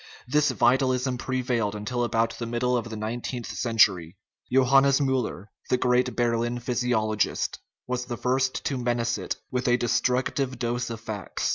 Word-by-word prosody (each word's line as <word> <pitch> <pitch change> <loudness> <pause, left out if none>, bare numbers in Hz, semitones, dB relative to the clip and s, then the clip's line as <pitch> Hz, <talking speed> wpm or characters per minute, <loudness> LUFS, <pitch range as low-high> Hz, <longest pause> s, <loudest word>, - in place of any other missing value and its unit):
This 150 +3 +3
vitalism 130 0 +2
prevailed 125 -5 -1
until 120 +4 -2
about 115 0 0
the 115 - -3
middle 120 +2 0
of 115 -1 -2
the 110 - -6
nineteenth 120 +3 -4
century. 95 -7 +2 0.3
Johannes 135 +2 +5
Miiller, 130 -7 -1 0.2
the 125 - +3
great 125 -1 +1
Berlin 120 0 0
physiologist, 120 -3 0 0.3
was 125 0 -2
the 120 -2 -5
first 130 +1 0
to 135 -3 -1
menace 120 -1 0
it - - -3 0.2
with 125 0 -1
a 120 0 +4
destructive 125 +2 0
dose 120 0 -2
of 115 -1 -6
facts. 105 -4 -3
120 Hz, 150 wpm, -26 LUFS, 115-125 Hz, 0.3 s, Johannes